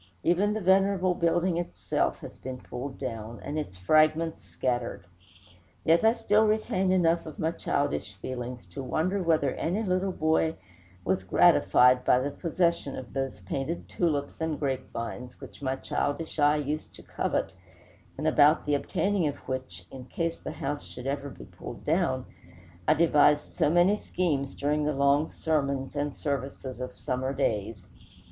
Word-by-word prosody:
Even 190 +5 +3
the 220 - -2
venerable 190 0 +3
building 170 +1 +1
itself 175 0 -1
has - - -9
been 130 0 -7
pulled 125 +2 -7
down, 115 -3 -5
and 150 +3 -3
its 95 -12 -6
fragments 155 - +3
scattered; 115 +3 -2 0.8
yet 165 +1 +5 0.2
still 215 -2 +3
I - - +4
retain 200 -3 +1
enough 170 -3 +2
of 155 - -8
my 160 +1 0
childish 105 - -2
feelings 125 +2 -6
to 90 - -6
wonder 175 +9 0
whether 160 -6 +2
any 190 +7 -1
little 185 -1 0
boy 160 -1 +1 0.5
was 95 0 +1
gratified 125 +6 +5
by 125 - +5
the 135 +3 -1
possession 170 -2 0
of 125 -2 -8
those 135 -9 -3
painted 135 - -4
tulips 150 -4 -1
and 160 -2 -1
grapevines, 125 -3 -4
which - - -12
my 130 -1 -1
childish 150 +4 -3
eye 145 0 +5
used 150 +1 -3
to - - -13
covet, - - -1 0.7
and 150 - -4
about 155 0 +5
the 150 - +1
obtaining 180 +4 +1
of 145 - -2
which, 130 -10 -5
in 130 -2 -9
case 165 +6 -3
the - - -6
house 145 +1 -3
should 125 - -10
ever 140 +1 -2
be - - -11
pulled - - -10
down, - - +1 0.6
I - - +5
devised 150 -2 +4
so - - +2
many 175 +5 +4
schemes 150 -9 -1
during 150 +1 0
the 150 +1 +1
long 140 +2 +3
sermons 140 -4 -1
and 145 -1 -2
services 135 -2 -4
of 125 0 -5
summer 130 +2 -2
days. 105 -6 -1
145 Hz, 160 wpm, -28 LUFS, 130-170 Hz, 0.8 s, yet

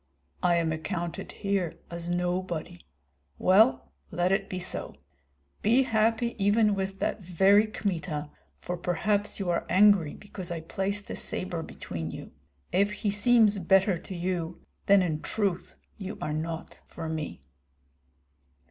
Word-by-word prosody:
I 175 -1 +3
am 165 -1 +1
accounted 170 +2 -4
here 195 -5 -2
as 170 0 -4
nobody. 175 -1 -2 0.5
Well, 185 - +4 0.2
let 175 +2 0
it 195 0 0
be 185 - -4
so. 180 - -2 0.7
Be 240 +6 +4
happy 225 0 +1
even 210 +1 +4
with 195 0 -3
that 210 - -2
very 195 +4 +4
Kmita, 165 -8 -3 0.3
for 180 - -5
perhaps 205 +6 0
you 185 -3 0
are 170 - 0
angry 190 -4 +5
because 195 -3 -6
I 170 -2 -4
placed 195 +5 -1
a - - -3
sabre 175 -3 -3
between 80 - -6
you. - - -8 0.4
If 200 +2 +2
he 210 0 -1
seems 210 0 +5
better 190 0 +3
to 190 - -8
you, 175 -1 -3 0.2
then 200 -1 +6
in 155 -3 -2
truth 195 -5 -2 0.2
you 195 0 -6
are 150 - -3
not 160 +1 -5
for 165 -1 -7
me." 155 - -4
185 Hz, 140 wpm, -28 LUFS, 170-205 Hz, 0.7 s, then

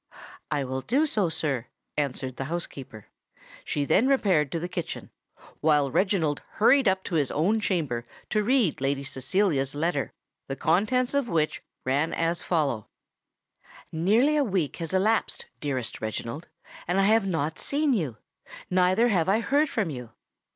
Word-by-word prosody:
"I 145 -2 0
will 130 0 -3
do 270 - +2
so, 210 - +1
sir," 135 -7 -2 0.3
answered 130 -3 -2
the 135 - -3
housekeeper. 135 -9 -6 0.6
She 145 -1 -1
then 220 - +3
repaired 190 - +3
to 165 - -1
the 175 - -3
kitchen, 175 -2 -5 0.5
while 150 -3 +3
Reginald 165 -3 +1
hurried 255 +3 +4
up 190 0 +2
to - - -6
his 150 -5 +2
own 195 +9 +1
chamber 155 - -1 0.3
to 215 - +2
read 230 - +2
Lady 135 +1 0
Cecilia's 140 0 0
letter, 150 -1 -1 0.4
the 135 - -3
contents 215 - +1
of 280 -4 +1
which 155 -3 0 0.2
ran 140 +5 +1
as 165 +1 0
follow:— 140 - 0 1.0
"Nearly 220 - +3
a 290 - +4
week 185 - -1
has 165 -2 -4
elapsed, 205 +4 +1
dearest 130 -5 -3
Reginald, 115 +7 -4 0.4
and 180 +3 +1
I - - +4
have 215 -1 +4
not 160 -4 -1
seen 290 0 +1
you! 150 - -1 0.5
neither 185 +6 +4
have 185 -4 +2
I 205 +3 +4
heard 285 +5 +2
from 205 - -1
you. 125 -4 -8
170 Hz, 155 wpm, -27 LUFS, 140-210 Hz, 1.0 s, hurried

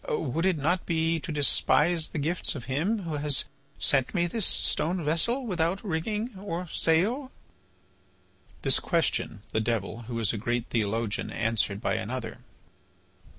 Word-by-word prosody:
Would 160 +4 0
it 185 -4 +2
not 175 +6 0
be 165 -1 +1
to 150 - -6
despise 155 +2 +3
the - - -5
gifts 160 +4 -1
of 130 - -6
Him 175 - 0
who 160 -3 -3
has 145 -1 0 0.3
sent 135 +3 +2
me 175 -1 +3
this 200 +4 +1
stone 170 +2 0
vessel 235 - +2
without 180 -1 -1
rigging 210 +5 -2
or 180 -2 -4
sail?" 220 - +1 1.3
This - - +4
question, 100 - 0
the 110 - 0
Devil, 115 -1 -2
who 120 - -3
is 115 -1 +2
a 110 - -3
great 120 +2 -1
theologian, 110 -1 -1
answered 110 -2 0
by - - 0
another. - - -4
160 Hz, 150 wpm, -28 LUFS, 120-180 Hz, 1.3 s, This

